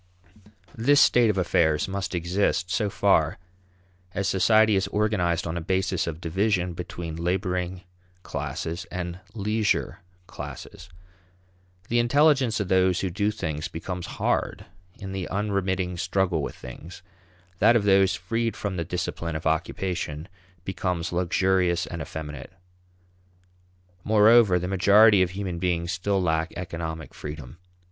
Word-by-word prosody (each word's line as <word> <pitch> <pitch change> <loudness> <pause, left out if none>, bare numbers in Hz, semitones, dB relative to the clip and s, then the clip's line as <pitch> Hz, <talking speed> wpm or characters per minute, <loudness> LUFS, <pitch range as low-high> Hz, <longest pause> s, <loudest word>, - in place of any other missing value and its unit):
This 140 +6 +3
state 120 -2 +5
of 100 - 0
affairs 80 -3 +2
must 95 -1 -3
exist 90 +1 0
so 105 +1 0
far - - +2 0.8
as 100 -1 -1
society 110 +3 +4
is 95 - +1
organized 95 -6 0
on 85 0 -3
a - - -3
basis 95 +1 -1
of 80 -1 -4
division 90 +1 0
between 85 -1 -6
laboring 90 0 -2 0.4
classes 85 +1 -4
and 90 0 -5 0.2
leisure 105 0 0 0.3
classes. - - -9 1.0
The 120 - +1
intelligence 130 -1 +3
of 105 - -2
those 95 -1 +2
who 95 - -2
do 100 +3 0
things 80 -8 -3
becomes 90 +2 -6
hard - - -1 0.3
in 95 -1 -7
the 95 -2 -4
unremitting 95 -3 -1
struggle 90 -2 0
with - - -5
things; 80 +8 -11 0.6
that 120 - +5
of 115 - +3
those 95 -1 +4
freed 115 +5 -2
from 100 -3 -3
the 85 - -1
discipline 85 -1 -4
of 80 - -5
occupation 80 0 -2 0.4
becomes 90 -3 -2
luxurious 90 0 +1
and 85 -1 -6
effeminate. 75 -1 -7 1.5
Moreover, 110 -2 +5
the 90 0 -3
majority 100 +2 +5
of 90 - +2
human 95 -2 -4
beings 85 -1 -1
still 100 +1 0
lack 80 -2 0
economic 80 -3 -5
freedom. 75 0 -8
90 Hz, 130 wpm, -25 LUFS, 85-100 Hz, 1.5 s, state